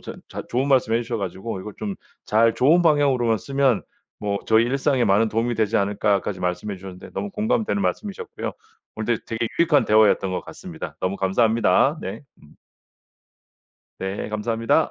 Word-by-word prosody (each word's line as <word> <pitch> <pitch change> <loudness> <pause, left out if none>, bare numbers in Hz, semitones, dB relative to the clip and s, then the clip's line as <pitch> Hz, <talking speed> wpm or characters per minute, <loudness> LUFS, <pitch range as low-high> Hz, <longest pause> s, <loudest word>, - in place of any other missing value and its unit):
저 - - -8
자 - - -6
좋은 130 +3 0
말씀 125 -4 +3
해주셔 115 0 -1
가지고 95 +1 -4
"이걸 105 +1 -8
좀 100 -2 -3 0.3
잘 115 +1 +3
좋은 160 +7 +4
방향으로만 135 -8 +3
쓰면 135 -4 +1 0.4
뭐 100 -1 -2
저희 110 +1 +4
일상에 135 0 +1
많은 105 +3 +3
도움이 115 +2 0
되지 110 -1 +1
않을까." 100 0 +1
까지 95 -3 -4
말씀해 90 +3 -2
주셨는데 95 -1 -10
너무 205 - -3
공감되는 215 0 0
말씀이셨고요. 205 -2 -3 0.4
오늘 110 +1 0
되 115 - -5
되게 115 -1 0
유익한 165 -3 +4
대화였던 105 -3 +4
것 90 - -1
같습니다. - - -8
너무 95 +2 -1
감사합니다. 115 - +2
네 - - -6 0.2
음. 75 - -18 1.5
네, 95 +2 -4
감사합니다. 115 +7 +1
115 Hz, 380 characters per minute, -23 LUFS, 100-135 Hz, 1.5 s, 좋은